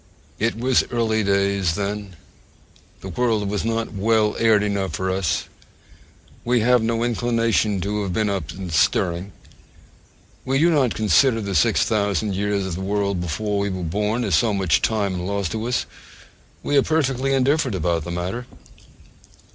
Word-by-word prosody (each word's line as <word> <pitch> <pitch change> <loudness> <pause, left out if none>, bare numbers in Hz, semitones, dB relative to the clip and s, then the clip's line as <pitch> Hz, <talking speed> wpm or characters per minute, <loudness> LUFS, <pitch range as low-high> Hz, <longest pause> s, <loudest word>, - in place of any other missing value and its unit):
It 115 +2 0
was 125 +2 +2
early 110 -2 0
days 100 -3 +1
then: 100 -1 -4 0.9
the 95 - -7
world 110 0 0
was 100 0 -2
not 115 0 -2
well 105 +1 +1
aired 110 -2 +4
enough 100 -2 -2
for 95 0 -2
us: 95 -5 0 1.0
we 120 -1 +2
have 125 +1 +4
no 115 +1 0
inclination 115 -3 +1
to 105 +3 -2
have 100 -2 -3
been 105 +4 0
up 100 -2 -3
and 95 -4 -6
stirring. 85 +4 +1 1.1
We 135 +1 0
do 165 +4 +4
not 135 -7 +2
consider 115 +3 +3
the 100 -2 -4
six 110 +3 +3
thousand 105 -1 0
years 100 0 -1
of 95 - -4
the 90 - -5
world 100 -1 -1
before 100 +5 -2
we 100 0 -1
were 95 -2 -4
born 105 +8 -1
as 100 -5 -1
so 105 +6 +3
much 95 -4 +2
time 100 -4 0
lost 95 -1 -2
to 110 +3 -3
us: 125 - 0 0.8
we 145 - 0
are - - +6
perfectly 135 -3 0
indifferent 135 -3 +1
about 85 -2 0
the 85 - -7
matter. 90 +8 -4
105 Hz, 165 wpm, -22 LUFS, 95-115 Hz, 1.1 s, are